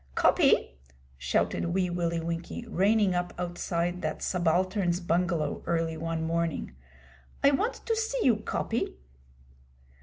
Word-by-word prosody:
'Coppy,' - - +3 0.4
shouted 85 - 0
Wee 185 -2 +1
Willie 170 -1 -1
Winkie, 170 +7 -4
reining 205 -1 +3
up 175 0 -2
outside 175 0 -2
that - - -3
subaltern's 180 +1 +1
bungalow 175 -2 0
early 165 -1 0
one 165 0 -3
morning 165 - -2 0.7
'I 280 - +7
want 420 - +1
to 455 - +1
see 450 +2 -1
you, 235 -4 +4
Coppy!' 225 - -2
175 Hz, 120 wpm, -28 LUFS, 165-190 Hz, 0.7 s, I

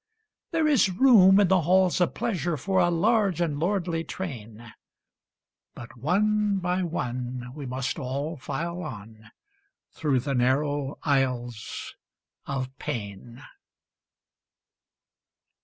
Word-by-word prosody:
There 325 -2 +1
is 280 -9 +4
room 195 -2 +6
in 200 - +5
the 190 -2 +4
halls 185 +2 +3
of 175 - +1
pleasure 180 -8 -1
For 190 +7 0
a 175 -1 +4
large 195 +1 +2
and 155 -4 -1
lordly 170 -2 -1
train, 115 - -7 1.0
But 120 - -10
one 205 - +1
by 180 0 -1
one 125 -6 -4
we 145 -2 -7
must 130 +4 -3
all 140 +4 -3
file 165 +6 -4
on 110 - -9 0.6
Through 140 -5 0
the 140 +2 -2
narrow 135 +3 0
aisles 125 -5 -2 0.5
of 135 -1 -4
pain. 115 +4 -6
150 Hz, 110 wpm, -26 LUFS, 125-185 Hz, 1.0 s, room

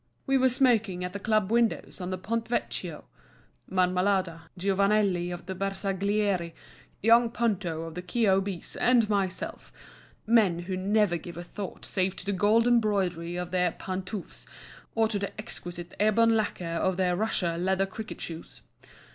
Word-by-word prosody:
We 270 - +2
were 260 -1 +4
smoking 225 -8 +2
at 180 0 -4
the 200 - -4
club 215 -1 +1
windows 230 -4 +1
on 180 - -3
the 185 - -2
Ponte 225 +5 -2
Vecchio; 240 - -2 0.6
Marmalada, 185 -2 +1
Giovanelli 195 -1 +2
of 175 0 -7
the 190 - -4
Bersaglieri, 195 -1 -1 0.5
young 230 +2 +6
Ponto 195 -9 -1
of 165 -1 -7
the 180 - -5
K.O.B.'s, 195 -2 0
and 240 -3 +4
myself—men 200 0 -1
who 185 +2 -4
never 200 -1 +2
give 170 +1 -9
a 175 - -5
thought 195 +2 -7
save 185 -1 0
to - - -4
the 200 - 0
gold 210 +4 +3
embroidery 195 -8 +1
of 180 0 -4
their 180 -2 +1
pantoufles 190 +1 -6 0.5
or 225 -1 +3
the 205 -2 -2
exquisite 175 -5 -6
ebon 225 +2 +4
laquer 185 -6 -1
of 190 -1 0
their 180 -1 +2
Russia 180 -4 0
leather 190 +2 +1
cricket 215 +3 -8
shoes. 165 -1 -7
195 Hz, 145 wpm, -28 LUFS, 180-215 Hz, 0.6 s, young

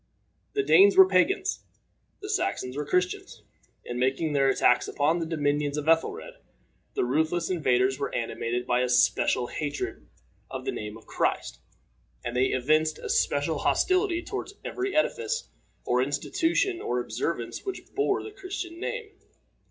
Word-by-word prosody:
The 415 - +1
Danes 395 -1 +6
were 380 -1 +10
pagans. 390 +1 +2 0.6
The 405 - -5
Saxons 130 - -1
were 145 0 -3
Christians. 180 +2 -1 0.4
In 120 0 -4
making 135 +5 0
their 135 -1 +3
attacks 125 -2 +3
upon 155 +4 +1
the 165 - -3
dominions 145 -2 0
of 150 0 -3
Ethelred, 165 0 +1 0.6
the - - +1
ruthless 160 +7 0
invaders 130 -6 +2
were - - -3
animated 120 +1 -2
by 120 - +2
a 125 - 0
special 125 0 +3
hatred 145 +3 -4 0.4
of - - -6
the - - 0
name 105 0 -6
of 115 - -17
Christ, - - -1 0.7
and 120 0 -3
they 125 +1 +3
evinced 155 +5 +1
a 450 - -7
special 465 +2 +1
hostility 370 -2 +2
toward 405 +1 -5
every 390 +1 -3
edifice, 460 +9 0 0.4
or 125 +1 +2
institution, 335 - 0
or 125 - -1
observance 120 +2 -3
which 390 - -7
bore 415 - +1
the 425 - -8
Christian 370 -3 -6
name. 450 +1 -4
155 Hz, 150 wpm, -27 LUFS, -, 0.7 s, were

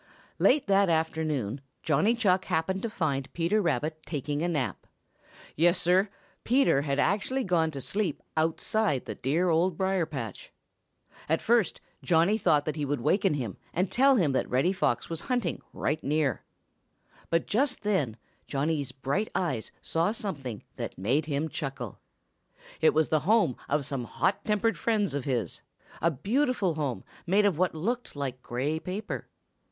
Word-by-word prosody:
Late 280 +1 +4
that 195 -1 +4
afternoon 155 -7 0 0.2
Johnny 160 +9 +3
Chuck 190 -5 +2
happened 190 +4 0
to 230 - -2
find 140 -9 -2
Peter 175 +6 +1
Rabbit 155 -2 -1
taking 145 -1 -3
a 170 - +1
nap. 150 -7 -2 0.7
Yes, 175 +3 +4
Sir, 185 +4 +3 0.3
Peter 250 - +3
had 140 -1 -1
actually 210 - +1
gone 170 -5 +2
to 140 -3 -6
sleep 190 - -1 0.2
outside 160 - +1
the 110 - -4
dear 155 - 0
Old 170 +1 +2
Briar 190 -3 +1
patch. 130 -8 -6 0.8
At 160 - +3
first 230 -3 +2 0.2
Johnny 170 +4 +3
thought 150 -7 +3
that 155 0 -2
he 150 - -1
would 145 -2 -1
waken 190 - +2
him 120 -8 -4 0.2
and 180 +2 +1
tell 270 +2 +5
him 170 - +3
that 130 - 0
Reddy 135 +10 +2
Fox 120 -10 0
was 165 -1 -4
hunting 245 - 0
right 150 +3 -2
near. 145 -3 +1 0.9
But 165 0 +1
just 255 +3 +1
then 155 - 0 0.3
Johnny's 145 -1 -1
bright 140 +11 -2
eyes 135 -12 -1
saw 165 +5 +1
something 140 - -5
that - - -5
made 130 +11 +1
him 150 +1 -1
chuckle. 135 - -5 0.8
It 160 - +5
was 155 -1 +3
the 155 - +3
home 200 - +3
of 145 -2 +1
some 130 -3 -3
hot 195 +10 0
tempered 215 +1 +1
friends 215 -6 +1
of 145 -1 -2
his, 120 - -1 0.4
a 170 - +4
beautiful 205 - +1
home 145 -5 -2 0.2
made 200 +4 +4
of 185 -6 +2
what 180 -2 +2
looked 230 +8 -2
like 130 -3 -4
gray 140 +7 -2
paper. 190 +6 -5
160 Hz, 160 wpm, -28 LUFS, 140-195 Hz, 0.9 s, tell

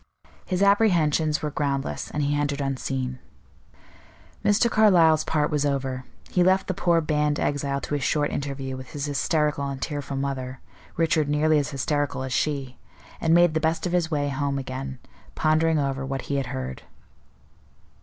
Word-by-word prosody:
His 185 0 +1
apprehensions 165 -7 +3
were 150 - -1
groundless, 140 -2 -2
and 150 - -2
he 145 +1 +1
entered 145 0 -1
unseen. 130 -2 -2 1.2
Mr. 210 +3 +4
Carlyle's 175 -9 +5
part 150 0 0
was 150 -1 +1
over; 135 -3 -2 0.3
he 180 - +2
left 190 +1 +3
the 185 - -2
poor 170 -2 +2
banned 150 -1 0
exile 140 -1 -1
to - - -5
his 145 -2 -1
short 145 +2 +1
interview 135 -2 -4
with 130 -1 -10
his 145 -1 -3
hysterical 145 0 0
and 135 -1 -5
tearful 140 -1 -4
mother, 135 -1 -3 0.4
Richard 160 -2 +2
nearly 150 +1 +3
as 145 - -2
hysterical 145 -1 -1
as 130 -1 -4
she, 135 -4 -1 0.4
and 165 0 +3
made 175 -2 +5
the 160 - +1
best 160 +2 0
of 180 - -1
his 175 -2 +1
way 145 -3 0
home 140 0 -1
again, 130 0 -5 0.4
pondering 160 +1 +2
over 135 -2 -1
what 135 -1 -3
he 140 - -2
had 135 - -2
heard. 65 0 -5
145 Hz, 165 wpm, -25 LUFS, 135-160 Hz, 1.2 s, Carlyle's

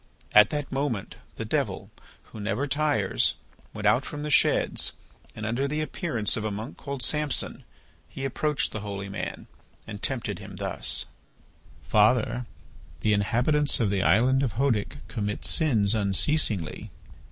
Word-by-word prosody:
At 105 0 +8
that 145 -2 -3
moment, 135 -7 -2 0.2
the - - -4
Devil, - - -2 0.3
who 110 - -12
never 105 +6 -1
tires, 145 -8 +1 0.4
went - - -6
out - - +4
from 150 0 -6
the 150 - -3
sheds - - +3 0.4
and, 110 - -5
under 120 +5 0
the 150 +2 -2
appearance 150 -7 -1
of 110 - -3
a 110 - -1
monk 110 +6 -6
called 140 -2 -5
Samson, 150 -2 -1 0.5
he 135 - -5
approached 150 +2 0
the 110 - -4
holy 100 -1 -5
man 100 - -5 0.4
and 105 -2 -8
tempted 115 -6 -2
him 100 -1 -9
thus: 95 0 -2 0.8
"Father, 120 +3 +3 0.5
the 105 - +3
inhabitants 125 +9 +2
of 110 -5 +2
the 100 -1 +1
island 125 +8 +4
of 125 -7 -1
Hœdic 125 -1 +1
commit 105 -4 -3
sins 115 - +3
unceasingly. 100 - +1
115 Hz, 145 wpm, -27 LUFS, 105-140 Hz, 0.8 s, At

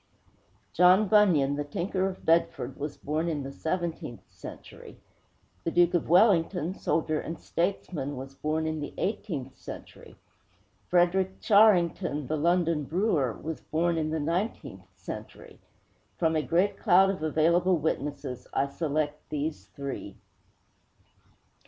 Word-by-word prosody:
John 180 +4 +5
Bunyan, 170 -10 +4
the 145 - -1
tinker 185 +6 -1
of 185 - -10
Bedford, 165 +1 +1
was 145 +1 -5
born 155 +3 -2
in 150 -4 -2
the 135 - -6
seventeenth 160 - -4
century; - - -11 0.7
the - - 0
Duke 175 0 +3
of 175 -4 0
Wellington, 180 -2 +4
soldier 155 -4 -1
and 165 - -6
statesman, 165 -5 -2
was 135 +1 -8
born 155 +3 -2
in 155 0 -2
the 145 - -6
eighteenth 175 - -3
century; - - -11 0.7
Frederick 185 +2 +2
Charrington, 180 - +3
the 155 - -2
London 165 0 +1
brewer, 165 - +1
was 160 +6 -6
born 170 +2 0
in 155 -1 -1
the 160 0 -1
nineteenth 170 +9 -3
century. - - -9 0.6
From 160 -2 +1
a 155 - +2
great 175 +6 +1
cloud 190 +2 +5
of 190 - -6
available 170 +4 +3
witnesses 145 -4 -3
I 140 +1 +1
select 150 0 -2
these 150 +1 -3
three. 140 -1 -6
165 Hz, 130 wpm, -28 LUFS, 150-180 Hz, 0.7 s, John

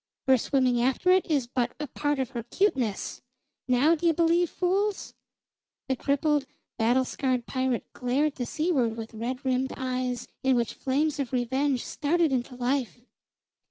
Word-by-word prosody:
Her 265 - +6
swimming 255 -2 +2
after 265 +9 +2
it 375 0 +4
is 285 -6 +2
but 245 0 -2
a 300 - -2
part 290 +1 -1
of 260 -3 -2
her 235 - -4
cuteness. 245 - -1 0.5
Now 260 +6 +4
d'ye 335 0 +2
believe, 335 +1 +3
fools!" 390 +3 -1 0.7
The 265 - +1
crippled, 285 +1 +1 0.3
battle 245 +3 +2
scarred 255 -3 -1
pirate 260 -2 -1
glared 275 +4 0
to 245 -2 -3
seaward 270 -9 0
with 225 0 -7
red 250 +4 -4
rimmed 260 +1 0
eyes 255 -1 -2
in 265 -1 +3
which 235 -2 0
flames 290 +3 0
of 270 -4 -2
revenge 260 +2 0
started 320 +1 +1
into 250 0 -2
life. 250 0 -1
265 Hz, 155 wpm, -27 LUFS, 245-300 Hz, 0.7 s, Her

